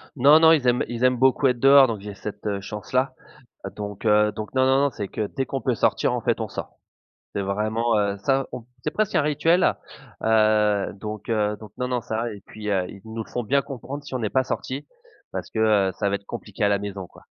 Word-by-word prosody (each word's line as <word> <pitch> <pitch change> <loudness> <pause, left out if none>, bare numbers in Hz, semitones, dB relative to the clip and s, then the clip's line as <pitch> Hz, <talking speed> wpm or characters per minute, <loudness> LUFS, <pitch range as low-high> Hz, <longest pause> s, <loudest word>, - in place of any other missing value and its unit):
Non, 145 +4 +7
non, 160 0 +7
ils 155 -5 +3
aiment 125 0 +3
ils 120 +1 -4
aiment 125 0 +4
beaucoup 130 +2 +4
être 125 -2 0
dehors 135 +1 +7
donc 110 -3 -3
j'ai 105 0 -7
cette, 105 +1 -8
heu, 100 -1 -2
chance-là. 130 +6 -2 0.6
Donc 105 0 -6
heu, 105 -1 +4
donc 105 +3 -7
non, 130 0 +3
non, 135 0 +4
non, 140 0 +2
c'est 100 -4 -5
que 105 - -3
dès 135 +5 -3
qu'on 135 - -3
peut 125 - 0
sortir, - - +1
en - - -1
fait, - - 0
on - - -2
sort. - - -8 0.6
C'est 100 - 0
vraiment, 110 +4 0
heu, 100 -1 0
ça, 135 +6 +1
on 125 -2 -7 0.2
c'est 150 - -1
presque 215 +4 -1
un - - +4
rituel, 150 +4 +2 0.5
heu, 110 -2 +3
donc 105 +2 -7
heu, 105 -2 +1
donc 105 -2 -11
non, 125 - -2
non, 125 -1 -1
ça 115 0 -3
et 100 - -11
puis, 105 -1 -7
heu, 95 -3 +1
ils 100 - -11
nous 110 0 -5
le - - -18
font 125 - -3
bien 140 +5 +2
comprendre 140 +1 -7
si 145 - -10
on - - -1
n'est 110 -3 -1
pas 130 +4 +2
sortis 130 +2 -4 0.4
parce - - -5
que, 110 - -4
heu, 105 -3 +3
ça 100 - +1
va 100 - 0
être 100 0 -8
compliqué 105 -2 -6
à 100 - +4
la 100 -1 +2
maison, 100 -2 -6
quoi. - - -18
110 Hz, 245 wpm, -24 LUFS, 105-130 Hz, 0.6 s, Non